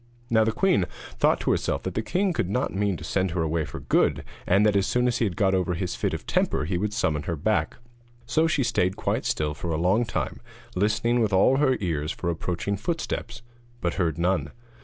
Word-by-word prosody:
Now 110 -1 +5
the 110 - +1
queen 125 - +2 0.3
thought - - +3
to - - +1
herself - - 0
that 95 - -3
the 110 - -1
king 180 - 0
could 90 - -1
not 125 +6 -1
mean 100 -1 0
to - - -10
send 95 -1 0
her 85 0 -1
away 80 0 0
for 70 - -8
good, - - +2 0.2
and 100 +3 +4
that 105 -1 +3
as 100 0 +2
soon 125 0 +2
as 125 -1 0
he 115 - +2
had 95 -5 -2
got 95 -3 +2
over 90 -1 +1
his 90 +1 -3
fit - - -1
of - - -8
temper 75 - +1
he 90 +3 -2
would 100 +4 -1
summon 80 -8 0
her 85 - 0
back; 105 +8 0 0.5
so 155 +7 +2
she 150 -4 +1
stayed 95 -6 +1
quite - - -1
still 75 -1 0
for 85 +4 -5
a 80 - 0
long 95 +8 +2
time, 115 - -3 0.4
listening 110 +5 +1
with 110 -4 +1
all 100 +8 +5
her 135 -3 +3
ears 80 -4 -1
for 85 - -2
approaching 90 +4 -2
footsteps, 120 - -4 0.4
but 85 -5 -1
heard 80 -3 0
none. 90 +2 +1
100 Hz, 225 wpm, -26 LUFS, 85-115 Hz, 0.5 s, Now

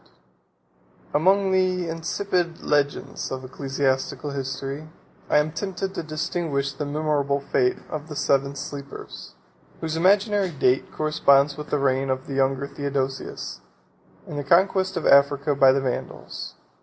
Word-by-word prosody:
] - - -32
Among 190 +5 +3
the 185 -2 +1
insipid 170 +1 -2
legends 145 -1 0
of 130 0 -5
ecclesiastical 135 +2 -1
history, 135 +2 -4 0.4
I - - +4
am 150 +1 +2
tempted 190 +3 -3
to - - -3
distinguish 155 -3 -2
the 145 +1 -4
memorable 145 -2 0
fable 130 -2 0
of 155 0 -5
the 150 - -6
Seven 140 0 +1
Sleepers; 140 - -8 0.4
43 - - -25
whose 160 -1 -2
imaginary 200 +3 +3
date 135 -4 +1
corresponds 145 -2 +3
with 150 0 -8
the - - +1
reign 135 -1 +1
of 130 0 -1
the 140 - -6
younger 135 0 +1
Theodosius, 140 -1 -4 0.7
and 145 - -5
the - - -3
conquest 190 +5 +3
of - - -3
Africa 140 +1 +5
by 135 -1 +6
the 135 +1 +1
Vandals. 130 -2 -5
145 Hz, 145 wpm, -24 LUFS, 135-165 Hz, 0.7 s, by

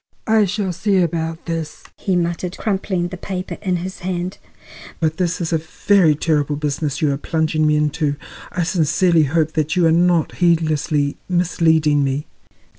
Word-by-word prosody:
"I 220 -1 +4
shall 195 -1 -2
see 195 +3 +1
about 165 -2 -1
this," 165 -2 -4
he 190 - -1
muttered, 175 +1 -2
crumpling 190 -4 -1
the 185 - -7
paper 185 0 -5
in 185 -3 0
his 185 +2 -5
hand. 180 0 -4 0.6
"But 160 -1 0
this 180 -1 -1
is 170 -1 -2
a 160 - +2
very 160 +1 +2
terrible 150 -1 0
business 145 0 -2
you 150 - +3
are 140 - -1
plunging 155 0 0
me 150 - +3
into. 150 -1 0 0.4
I 175 - -1
sincerely 165 0 +2
hope 160 +2 +1
that 155 -1 -1
you 180 -2 +3
are 165 - +4
not 170 -1 +2
heedlessly 155 -4 +1
misleading 160 -4 +2
me." 135 +2 -1
165 Hz, 165 wpm, -20 LUFS, 155-180 Hz, 0.6 s, I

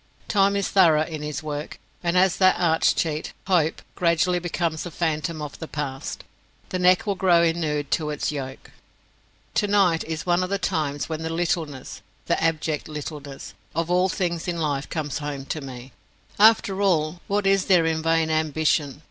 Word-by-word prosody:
Time 200 -1 +3
is 200 -1 0
thorough 160 -5 +5
in 155 -2 -6
his 150 0 -4
work, 150 0 -5 0.2
and 175 +1 0
as 185 0 +4
that 185 -1 +5
arch 160 -2 +3
cheat, 155 -2 -2
Hope, 170 -5 +1
gradually 175 +1 +2
becomes 170 -2 -2
a 175 - -5
phantom 155 -1 -2
of 145 -2 -8
the 160 - -6
past, 135 -4 -5 0.5
the 185 - -2
neck 180 +2 +4
will 205 - +1
grow 180 -3 +4
inured 155 -4 -1
to 155 -2 0
its 150 0 -2
yoke. 135 -3 -7 0.8
Tonight 200 -5 +2
is 160 -1 -4
one 175 0 +2
of 185 - -2
the 200 - 0
times 145 -6 -2
when 160 -1 -4
the 160 - -3
littleness 165 -5 -3 0.2
the - - 0
abject 155 -2 -1
littleness 145 -2 -7 0.2
of 165 +1 -1
all 180 +1 +3
things 170 -1 -2
in 175 -1 -2
life 145 -4 -2
comes 150 -3 -3
home 145 -2 -5
to 155 +2 -4
me. 130 -1 -9 0.5
After 205 -2 +5
all, 175 -3 +1
what 205 0 0
is 195 -1 +3
there 180 -4 +4
in 160 -1 0
vain 165 0 +2
ambition? 155 -2 0
160 Hz, 175 wpm, -24 LUFS, 150-180 Hz, 0.8 s, thorough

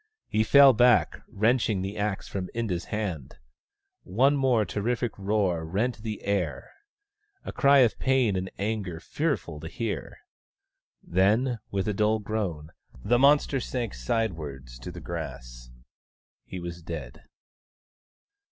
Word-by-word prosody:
He 110 - +2
fell 140 +3 +7
back, 120 0 +3
wrenching 110 -2 +1
the 100 +2 -4
axe 105 -1 -2
from 95 -2 -4
Inda's 105 -7 -2
hand. 95 - -4 0.6
One 130 +10 +2
more 130 -6 +2
terrific 115 +5 -1
roar 95 -4 0
rent 105 +9 -1
the 110 -1 -5
air 95 -7 -2 0.3
— 410 -1 -42
a - - -5
cry 140 -1 +5
of 120 -3 +2
pain 130 -6 +2
and 95 0 -2
anger 100 -5 -3
fearful 105 - -2
to 80 - -7
hear. 110 +5 -4 0.9
Then, 110 +7 +2
with 95 0 -2
a 105 - +1
dull 105 +2 +2
groan 100 -8 -4 0.3
the 120 +2 +3
monster 140 0 +4
sank 120 -3 -3
sidewards 70 - -3
to - - -7
the - - -9
grass. - - -7 0.8
He 95 - -7
was 85 0 -7
dead. 80 -8 -7
105 Hz, 135 wpm, -27 LUFS, 85-120 Hz, 0.9 s, fell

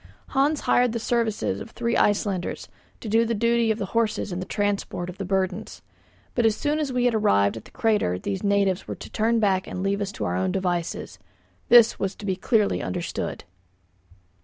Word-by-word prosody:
Hans 285 +2 +1
hired 245 -2 +3
the 235 - -2
services 225 -2 -1
of 225 - -8
three 235 0 -2
Icelanders 200 -3 0 0.3
to - - -7
do 225 +2 +3
the 230 0 -1
duty 230 +1 +2
of 220 - +1
the 200 - -2
horses 220 -3 0
in 175 - -3
the 185 - -5
transport 200 -3 -2
of 180 - -17
the 195 - -3
burdens; 190 0 -2 0.5
but 240 - +1
as 220 -2 +3
soon 295 +4 -1
as 295 -3 -1
we 250 -1 +1
had 245 - +3
arrived 100 - +3
at 115 - -9
the - - -14
crater 210 - +1
these 95 +1 -4
natives 200 -2 +1
were - - -4
to - - -10
turn 230 +1 +1
back 190 -3 +1
and 185 - -4
leave 200 +1 0
us 200 -1 -2
to - - -4
our - - -1
own 185 0 0
devices. 180 -3 -2 0.5
This 235 -2 +7
was 195 0 -2
to 210 - -9
be 190 -2 0
clearly 210 +2 +1
understood. 175 -1 -4
210 Hz, 205 wpm, -25 LUFS, 190-230 Hz, 0.5 s, This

